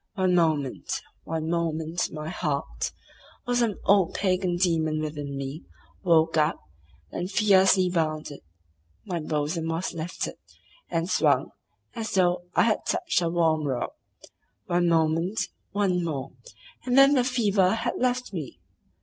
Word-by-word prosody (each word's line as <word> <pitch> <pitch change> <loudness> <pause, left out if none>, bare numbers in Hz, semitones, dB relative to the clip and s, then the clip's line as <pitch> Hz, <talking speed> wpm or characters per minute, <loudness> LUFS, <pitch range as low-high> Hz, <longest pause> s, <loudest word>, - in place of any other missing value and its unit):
One 185 -2 +2
moment—one 160 0 -1
moment 165 0 -1
my 155 0 -6
heart, 140 - -2 0.5
or 245 - -1
some 235 -4 +2
old 195 -3 +4
pagan 185 -2 +1
demon 160 -4 +1
within 145 -2 -4
me, 135 +4 -5 0.4
woke 165 -3 +3
up, 155 +1 +2 0.5
and 180 +1 -3
fiercely 190 -2 +4
bounded; 155 -4 -2 0.7
my 175 -2 -2
bosom 155 +2 -2
was 165 +3 -2
lifted, 165 +1 -4 0.5
and 165 0 -1
swung, - - +2 0.4
as 225 -2 -4
though 175 -1 +2
I - - +5
had 225 -2 +1
touched 350 - +1
her 170 -2 0
warm 160 -3 +2
robe. 125 -3 -2 0.7
One 175 0 +1
moment, 165 +5 +1 0.2
one 190 -3 +1
more, 135 -5 -3 0.5
and 250 +1 +1
then 275 +1 +8
the 255 -3 +3
fever 210 -6 +2
had 225 - -2
left 250 -2 0
me. 155 -7 -6
170 Hz, 130 wpm, -26 LUFS, 155-190 Hz, 0.7 s, then